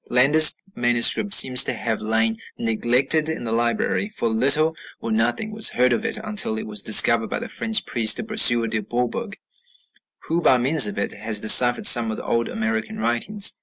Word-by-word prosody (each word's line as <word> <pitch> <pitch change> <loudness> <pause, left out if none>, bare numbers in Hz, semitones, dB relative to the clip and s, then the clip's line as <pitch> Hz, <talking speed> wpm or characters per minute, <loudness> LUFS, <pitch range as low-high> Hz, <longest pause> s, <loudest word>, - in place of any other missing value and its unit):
Landa's 145 +6 +3 0.2
manuscript 120 - +2
seems 130 -8 +6
to - - -2
have 115 -2 -5
lain 110 +1 -1 0.2
neglected 125 +7 -1
in 160 - -6
the 115 - -6
library, 120 - -2
for 210 - -4
little 140 +8 +1 0.2
or 115 - -7
nothing 120 - -2
was 215 0 0
heard 125 0 0
of 115 - -4
it - - -2
until 210 - -2
it - - -6
was 105 -1 -5
discovered 115 +1 +3
by - - -4
the - - -8
French 225 -1 -3
priest 115 -3 +2
Brasseur 130 - +4
de 110 -1 -4
Bourbourg, 125 - -5 0.9
who, 165 +2 -3
by 130 - +2
means 135 +1 +2
of 105 - -7
it, 100 - -3
has 110 -1 -2
deciphered 120 +3 +4
some 115 -2 +4
of 110 - -6
the - - -9
old 115 0 -3
American 110 0 -5
writings. 120 - 0
120 Hz, 185 wpm, -20 LUFS, 115-155 Hz, 0.9 s, seems